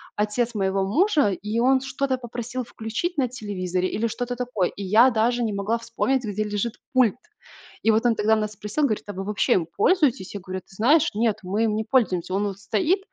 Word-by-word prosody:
отец 220 +3 -1
моего 195 -1 +1
мужа, 300 - +3
и 210 +4 -3
он 260 +2 +4
что-то 270 0 -1
попросил 245 +1 -5
включить 230 +10 -4
на 260 - +2
телевизоре 185 -6 -2
или 225 +4 -1
что-то 245 +2 -4
такое, 240 -7 -1
и 200 - -8
я 220 +7 +5
даже 240 +2 +1
не 220 -2 -1
могла 200 +3 -1
вспомнить, 240 +3 -1
где 215 0 -2
лежит 210 +2 -2 0.2
пульт. 255 -5 +4 0.7
И - - +3
вот 220 +2 +1
он 235 -2 +4
тогда 215 +1 +3
нас 215 -1 -2
спросил, 210 +8 -3
говорит: 215 -6 -1
"А 205 - -5
вы 190 0 -5
вообще 205 0 +1
им 175 - +1
пользуетесь?" 275 - +2
Я 200 - -5
говорю: 185 0 -5
"Ты 190 - -20
знаешь, 290 +10 +4
нет, 220 -1 +1
мы 200 +5 0
им 215 -1 0
не 220 0 -2
пользуемся. 190 -8 +1
Он 205 +2 +1
вот 195 -1 -6
стоит". 260 - +1
220 Hz, 210 wpm, -24 LUFS, 200-245 Hz, 0.7 s, я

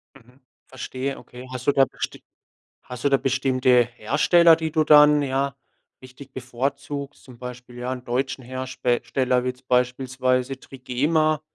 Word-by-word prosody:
Mhm. 125 0 -20 0.3
Verstehe, 130 +1 -5
okay. 125 +1 -12
Hast 130 +1 -7
du - - +6
da 135 -1 +4
besti - - -7 0.6
hast 125 +1 -9
du - - +5
da 135 - +4
bestimmte 130 -2 +2
Hersteller, 160 +8 +4
die 160 -1 -3
du 155 0 +2
dann, 150 -1 +6
ja, 135 0 -1 0.5
richtig 130 +1 -14
bevorzugst? 140 +3 -5
Zum 125 -3 -14
Beispiel, 125 0 -9
ja, 125 +1 -4
'n 125 -1 -8
deutschen 130 +2 -2
Herste 130 -1 -2
steller 125 -1 0
wie - - -3
jetzt 125 +1 -10
beispielsweise 130 +1 0
Trigema. 145 +5 0
130 Hz, 150 wpm, -23 LUFS, 125-140 Hz, 0.6 s, du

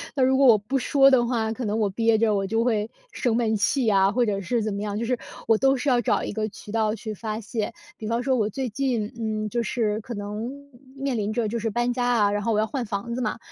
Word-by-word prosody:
那 265 - +2
如 265 +1 +4
果 275 -1 +5
我 220 -3 +8
不 260 +7 -2
说 275 +1 +5
的 240 -2 +4
话， 225 -3 0
可 235 +1 -4
能 210 +1 -1
我 210 -2 +1
憋 225 +2 +2
着， 220 -1 +2
我 195 -1 0
就 225 +2 +1
会 220 -2 0 0.2
生 240 -3 0
闷 230 -2 +1
气 235 +3 +2
啊， 195 0 +4
或 245 0 +2
者 200 -2 -1
是 215 +4 -1
怎 215 -2 -2
么 200 - -3
样， 205 0 -3
就 230 - -2
是 250 0 -1 0.3
我 225 -1 +4
都 270 +2 +3
是 270 +2 -1
要 245 - +4
找 240 - +1
一 - - -3
个 215 +1 -2
渠 210 0 -11
道 220 -1 +1
去 220 0 -6
发 215 +2 -4
泄。 220 +1 -3 0.2
比 215 - -6
方 230 +2 0
说 260 -1 +2
我 215 -2 +1
最 260 +4 -3
近， 230 -2 -1
嗯， 215 -1 -2
就 235 +2 -1
是 215 -1 -1
可 235 +2 -7
能 210 +2 -4 0.5
面 270 -2 -2
临 210 0 -1
着， 225 -2 0
就 235 +2 -2
是 225 - -1
搬 240 +3 0
家 245 0 -1
啊， 225 -5 +3
然 205 0 -1
后 230 - +1
我 210 - +2
要 215 - +2
换 245 +3 -3
房 205 +3 -4
子 245 - -3
嘛， 215 -1 -1
225 Hz, 295 characters per minute, -25 LUFS, 210-245 Hz, 0.5 s, 我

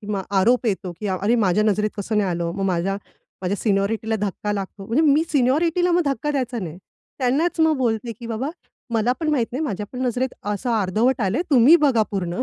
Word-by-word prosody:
किंवा 205 -2 -3 0.2
आरोप 245 +4 +3
येतो, 190 -4 -2
की 210 - -3
अरे 195 +5 +1
माझ्या 195 +3 +2
नजरेत 210 0 +1
कसं 210 +1 -1
नाही 195 -3 +1
आलं? 170 -1 -2
मग 195 - -3
माझ्या 185 +2 0 0.5
माझ्या 190 +3 -1
सिनियॉरिटीला 220 +2 0
धक्का 210 +1 -2
लागतो, 195 0 -5
म्हणजे 240 +9 +2
मी 305 - +3
सिनियॉरिटीला 325 +7 +2
मग 350 - +3
धक्का 280 +1 -1
द्यायचा 255 -3 -2
नाही. 170 -1 -6 0.4
त्यांनाच 290 +7 +1
मग 320 -2 +4
बोलते, 230 -1 -1
की 230 +2 -10
"बाबा, 235 +5 -3 0.5
मला 225 +2 +2
पण 315 - -1
माहित 250 -6 +1
नाही 270 +6 -2
माझ्या 210 -6 -3
पण 250 - -6
नजरेत 255 +1 0 0.2
असं 205 +5 -3
अर्धवट 225 +7 +1
आलंय 205 - 0
तुम्ही 270 +4 +7
बघा 235 -5 +3
पूर्ण." 185 +2 -2
225 Hz, 200 wpm, -22 LUFS, 195-260 Hz, 0.5 s, तुम्ही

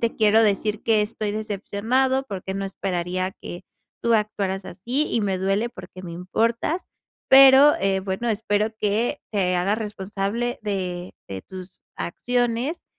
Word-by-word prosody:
te 230 -1 0
quiero 220 0 +5
decir 210 0 +1
que 220 -2 +3
estoy 210 0 -3
decepcionado 220 +5 0
porque 190 -3 -5
no 195 - -3
esperaría 185 -1 -2
que 175 +2 -8 0.4
tú 235 0 +3
actuaras 200 -3 -1
así 250 +13 -2
y 230 - +2
me 195 -2 0
duele 195 +5 0
porque 185 -5 -11
me 170 -2 -7
importas. 230 - -1 0.4
Pero, 270 +2 +8
eh, 195 0 +1
bueno, 190 +5 -3
espero 215 0 0
que 220 +7 0
te 180 -3 +1
hagas 200 +5 +1
responsable 210 +4 -3
de 185 -3 -3
de 95 -1 -6
tus 185 -1 -11
acciones 245 - -1
205 Hz, 145 wpm, -23 LUFS, 190-230 Hz, 0.4 s, Pero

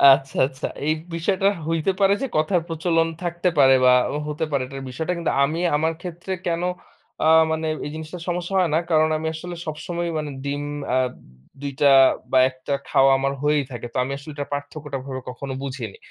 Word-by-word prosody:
আচ্ছা, 135 -1 -9
আচ্ছা। 130 +1 -5 0.2
এই 155 - +4 0.2
বিষয়টা 190 +4 +1 0.2
হইতে 165 +3 +1
পারে 195 0 +5
যে 270 - 0
কথার 170 +3 +2
প্রচলন 165 0 +1 0.2
থাকতে 175 +1 0
পারে 135 -2 +7
বা 125 - +7 0.3
হতে 150 +2 -2
পারে 140 -2 +1
এটার 135 0 -7
বিষয়টা 160 +8 -2
কিন্তু 170 - -1
আমি 155 +4 0 0.2
আমার 160 +2 +1
ক্ষেত্রে 175 +2 -5
কেন 170 0 0 0.6
আ - - +5 0.2
মানে 160 0 -1 0.2
এই - - -3
জিনিসটার 160 +2 -7
সমস্যা 175 +2 -3
হয় 180 -3 +2
না। - - +4
কারণ 155 0 +4
আমি 160 +1 -3
আসলে 175 +2 -6
সবসময় 170 +2 -3
মানে 150 -1 -3 0.2
ডিম 145 +1 -2 0.3
আ - - +4 0.6
২ 140 - -3
টা 140 -1 +7 0.4
বা 130 - +4
১ 130 - -16
টা - - +1 0.2
খাওয়া 135 0 +5
আমার 135 +1 0
হয়েই 150 -1 +3
থাকে। 120 -1 -6
তো - - -3
আমি 135 - -4
আসলে 140 +2 -9
এটার 145 -1 -5
পার্থক্যটাভাবে 140 -2 -5
কখনো 130 +2 -6
বুঝিনি। 130 -7 -5
155 Hz, 190 wpm, -23 LUFS, 140-170 Hz, 0.6 s, পারে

